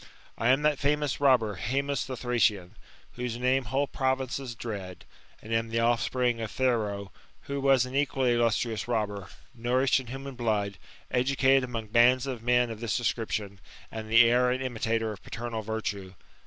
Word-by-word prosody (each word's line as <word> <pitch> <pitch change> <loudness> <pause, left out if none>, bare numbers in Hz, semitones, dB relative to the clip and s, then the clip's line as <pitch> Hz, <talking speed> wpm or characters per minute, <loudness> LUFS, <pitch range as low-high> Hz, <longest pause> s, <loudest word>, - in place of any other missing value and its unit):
I 115 - -1
am 135 +3 +3
that 150 -2 +2
fomous 145 -1 0
robber 125 -8 +3
Haemus 140 +5 -1
the 130 -2 -5
Thracian, 110 -7 +1 0.4
whose 125 -1 -4
name 130 +1 +1
whole 135 +6 0
pro 130 0 0
vinces 130 -1 -5
dread; 100 -6 -6 0.4
and 110 - -5
am 115 0 +1
the 115 +1 0
offspring 120 +1 +1
of 110 - -3
Thero, 105 -6 -1 0.3
who 140 0 -4
was 135 -2 +4
an 125 - -9
equally 135 -3 +1
illustrious 115 -2 0
robber, 105 -5 -2 0.3
nourished 125 +3 +2
in 130 - -9
human 135 +2 -7
blood, 105 -5 -1 0.3
educated 135 +1 +3
among 115 -3 -6
bands 120 +3 +4
of 130 -4 -4
men 125 0 +2
of 110 - -7
this 115 -2 -1
description, 110 -4 -2 0.3
and 110 -1 -6
the 115 +2 +7
heir 125 +1 +3
and 130 +1 -1
imitator 115 -2 -1
of 105 - -9
paternal 115 -1 -5
vittu^. 100 -3 -4
120 Hz, 170 wpm, -28 LUFS, 110-130 Hz, 0.4 s, the